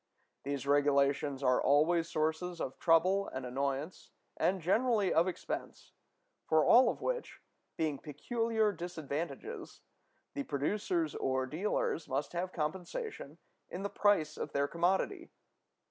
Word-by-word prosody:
These 140 -1 -3
regulations 140 -1 +2
are 125 -1 +3
always 165 +4 +3
sources 160 +3 -1
of 130 - -4
trouble 185 +4 +3
and 130 -1 -5
annoyance, 140 +5 -3 0.3
and 190 +1 +1
generally 210 +3 +2
of 170 +3 +4
expense, 185 - -5 0.6
for 155 -1 +4
all 255 +2 +7
of - - -4
which, - - -3 0.4
being 155 -4 -1
peculiar 220 - 0
disadvantages, 170 - -5 0.5
the 285 - -3
producers 165 - -1
or 130 0 0
dealers 165 +2 -1
must 140 +4 -2
have 180 +1 -2
compensation 185 - -4 0.3
in 185 - -5
the 200 - -3
price 160 -7 +2
of - - -5
their 140 0 +1
commodity. 190 - 0
165 Hz, 125 wpm, -33 LUFS, 140-195 Hz, 0.6 s, all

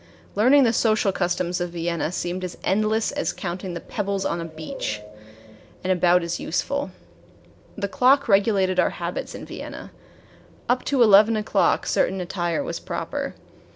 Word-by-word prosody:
Learning 260 +7 +5
the 235 -2 +3
social 215 -3 +2
customs 175 -1 -1
of 175 - -1
Vienna 170 -1 -2
seemed 180 +1 -3
as 180 -1 -5
endless 215 +3 +1
as 285 0 -1
counting 180 0 -5
the - - -4
pebbles 200 -2 -3
on 170 - -1
the 165 - -4
beach 155 -9 -5 0.8
and 185 0 +2
about 180 0 +3
as 170 0 -3
useful. 280 - -2 0.9
The 200 -1 -1
clock 265 +6 +3
regulated 195 -3 +3
our - - +4
habits - - -4
in - - -8
Vienna. - - -8 0.8
Up 250 +1 +1
to 270 -4 +3
eleven 215 +1 +6
o'clock 215 - +1
certain 190 - +1
attire 175 -2 -2
was - - -4
proper. - - -4
190 Hz, 155 wpm, -24 LUFS, 175-220 Hz, 0.9 s, eleven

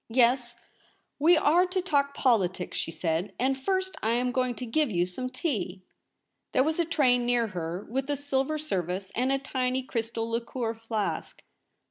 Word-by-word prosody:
' - - -56 0.2
Yes, 240 0 +2 0.6
we 330 +4 +6
are 335 +4 +4
to 370 +1 -1
talk 285 -6 +1
politics,' 190 -8 +1
she - - -2
said; 165 +3 -2
'and 265 +2 +2
first 375 +7 -1
I 220 +1 +1
am 250 +1 +1
going 255 -1 0
to 250 - -5
give 290 +5 +1
you 175 -4 +1
some 255 +8 -4
tea.' 200 - -3 0.7
There 260 - +4
was 315 +3 0
a 340 - +3
tray 280 -7 +3
near 240 -2 +1
her, 175 0 -4
with 265 +4 -2
a 290 - 0
silver 285 +2 0
service, 190 - -3
and 255 +3 +1
a 275 - +3
tiny 260 -1 -1
crystal 230 -2 -3
liqueur 230 0 -2
flask. 225 -2 -3
250 Hz, 175 wpm, -28 LUFS, 220-280 Hz, 0.7 s, we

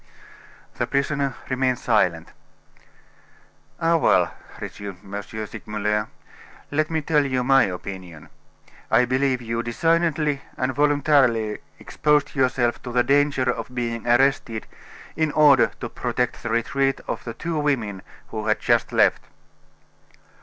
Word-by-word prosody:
The - - 0
prisoner 140 -1 -1
remained 130 -1 0
silent. 90 -10 +1 1.5
"Ah, 165 0 +3
well!" - - +3 0.3
resumed 100 -3 -7
M. 100 +1 -5
Segmuller, 105 0 -3 0.6
"let 155 +1 0
me 160 -1 -1
tell 150 -1 +2
you 130 -2 -1
my 135 +1 +5
opinion. 90 -3 -7 0.6
I 120 +3 +4
believe 130 0 0
you 115 0 -2
designedly 155 +3 +1 0.2
and 130 +1 -1
voluntarily 140 -6 +2 0.2
exposed 150 -1 0
yourself 125 -3 +1
to 125 - -7
the 120 0 +3
danger 140 -1 +2
of 125 0 -3
being 115 -1 -3
arrested 120 -2 +2 0.5
in 155 -1 0
order 145 -4 +6
to - - -3
protect - - -2
the - - -4
retreat 135 +4 0
of - - -4
the 115 - -6
two 165 -2 -3
women 120 -10 -1 0.3
who 110 -1 -5
had 110 - +2
just 120 -1 +1
left." - - +3
125 Hz, 125 wpm, -23 LUFS, 110-145 Hz, 1.5 s, order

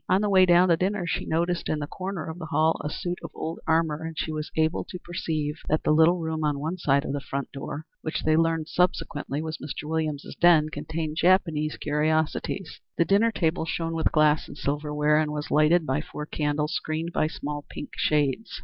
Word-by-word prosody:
On 190 - +4
the 210 -1 +1
way 185 -1 +6
down 175 +1 +6
to 170 - +6
dinner 190 +1 0
she 170 - -2
noticed 170 +2 0
in 155 - +1
the 150 - -3
corner 185 +1 -5
of 160 +2 -6
the 160 - -6
hall 160 +1 +2
a 150 - -2
suit 175 +3 -4
of - - -5
old 165 +1 -4
armor, 160 -1 +2
and 160 -1 -6
she 160 - -2
was 155 0 -4
able 160 +1 +1
to 180 - -7
perceive 160 -4 -3
that 155 - +1
the - - +2
little 160 +3 +5
room 160 -2 -3
on 150 -1 +1
one 160 +6 -3
side 140 -3 +2
of - - -3
the 145 - -1
front 140 0 -4
door, 145 +2 -6 0.2
which 155 - -3
they 155 0 +3
learned 165 -1 +1
subsequently 155 -5 -1
was 160 0 -5
Mr. 150 +1 -6
Williams's 155 -2 -2
den, 165 -3 +5
contained 160 -1 -4
Japanese 165 -4 +2
curiosities. 155 +4 -1 0.2
The 170 - +3
dinner 205 +5 +3
table 165 -5 0
shone 165 0 -2
with 165 -1 +1
glass 155 -1 +3
and - - -11
silver 150 +1 -2
ware, 150 +1 +3
and 155 -1 0
was 150 0 -4
lighted 155 +3 +4
by 135 +1 0
four 150 -1 -7
candles 150 0 -1
screened 160 +2 -3
by 155 - +2
small 145 -1 -5
pink - - -7
shades. 150 - 0
160 Hz, 215 wpm, -26 LUFS, 150-170 Hz, 0.2 s, way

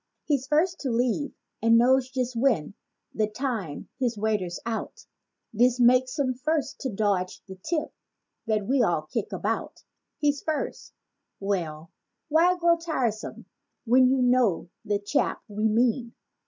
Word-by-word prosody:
He's 275 -3 0
first 325 +5 +2
to 270 - -2
leave 245 +4 0 0.3
and 230 0 +5
knows 255 +2 +4
just 255 -2 -2
when—(the 220 - -1
time 215 - -4
his 240 -4 0
waiter's 205 -5 -1
out) 230 -1 -4 0.2
— - - -55
This 245 +3 +3
makes 255 +3 +4
him 265 -3 +1
first 300 +3 -2
to 265 - -3
dodge 195 -4 -1
the 190 - -7
tip 310 - -3 0.5
that 215 -2 0
we 260 +4 +2
all 175 -8 +2
kick 205 +7 -4
about. - - -3 0.3
He's 290 -1 +1
first—well 190 - -5 0.4
why 340 +4 +4
grow 340 -1 +4
tiresome 260 -10 -3 0.4
when 255 +2 +5
you 260 0 +2
know 245 -9 +2
the 205 -2 0
chap 205 +8 -1
we 210 0 -2
mean. 235 +2 +1
245 Hz, 140 wpm, -26 LUFS, 210-270 Hz, 0.5 s, and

